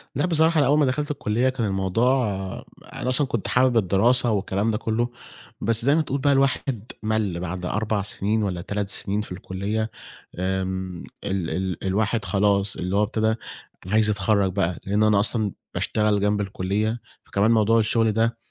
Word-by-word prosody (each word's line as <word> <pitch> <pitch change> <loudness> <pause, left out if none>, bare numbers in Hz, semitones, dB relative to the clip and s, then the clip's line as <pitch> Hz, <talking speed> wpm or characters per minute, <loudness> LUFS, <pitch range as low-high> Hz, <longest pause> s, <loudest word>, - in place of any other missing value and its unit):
لأ 145 - +1
بصراحة 165 -1 +3
أنا 140 - +3
أول 145 +2 +4
ما 150 - +4
دخلت 145 +3 -1
الكلّية 125 -2 0
كان 130 -4 -2
الموضوع 115 +7 +1 0.7
أنا 130 - -3
أصلًا 135 +2 +3
كنت 115 -5 -2
حابب 125 -1 +3
الدراسة 115 +5 +3
والكلام 100 +1 0
ده 105 - -1
كلّه، 115 +2 -1 0.5
بس 115 +1 +2
زي 140 +2 +4
ما 160 - +3
تقول 140 -2 -2
بقى 140 0 +3
الواحد 135 -4 0
مَل 110 -5 -1
بعد 90 0 -4
4 105 +2 -1
سنين 105 +2 -1
والّا 90 -4 -2
3 100 +2 -3
سنين 100 +1 -1
في 105 - -9
الكلّية، 100 +4 -3 0.5
آمم، 95 -1 -2 0.2
ال 95 -4 -2
ال 95 -2 -3
الواحد 105 +3 0
خلاص 100 0 +1
اللي 90 +2 -3
هو 105 - +3
ابتدي 110 +1 0 0.5
عايز 110 +2 +3
يتخرّج 100 -1 +1
بقى 90 -3 -1
لأن 105 +2 +1
أنا 105 -2 +4
أصلًا 105 0 +2 0.2
باشتغل 105 -1 +1
جنب 105 0 +1
الكلّية 105 +3 -2 0.2
فكمان 100 +3 +1
موضوع 115 0 +4
الشغل 110 0 +2
ده 115 +2 0
105 Hz, 170 wpm, -24 LUFS, 95-115 Hz, 0.7 s, أول